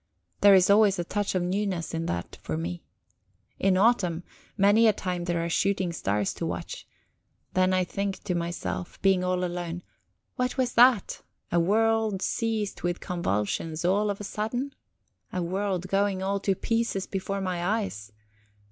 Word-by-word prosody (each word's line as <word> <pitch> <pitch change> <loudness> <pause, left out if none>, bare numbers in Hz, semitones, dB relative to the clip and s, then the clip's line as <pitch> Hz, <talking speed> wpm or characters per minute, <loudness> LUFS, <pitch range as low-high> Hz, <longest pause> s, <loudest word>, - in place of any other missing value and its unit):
There 200 -1 +7
is 185 -1 +5
always 205 -1 +5
a 175 - -1
touch 205 +3 -2
of 180 - +1
newness 185 -2 -2
in 165 0 -2
that 85 0 -4
for 80 - -3
me. 85 +2 -4 0.8
In 190 -1 +3
autumn, 185 -6 +2 0.3
many 205 +3 +5
a 215 - +5
time 180 -3 -3
there 170 -1 -1
are - - -1
shooting 190 0 0
stars 105 - -1
to - - -4
watch. - - -6 0.7
Then 185 0 +3
I 185 0 +2
think 195 +2 -3
to 180 - -1
myself, 170 - -4
being 190 -2 +4
all 180 0 0
alone, 175 0 -4 0.5
What 250 -1 -1
was 255 -2 0
that? 240 -4 +4 0.3
A 170 - +3
world 220 +2 +2
seized 220 -3 -1
with 175 0 -1
convulsions 160 - -2
all 205 +3 +2
of 200 - -3
a - - -6
sudden? 245 +7 -3 0.6
A 180 - -2
world 185 +1 -2
going 195 0 +1
all 200 +1 0
to 195 0 0
pieces 230 -2 -1
before 195 0 -3
my 180 -2 -2
eyes? 185 - -2
190 Hz, 165 wpm, -27 LUFS, 175-205 Hz, 0.8 s, There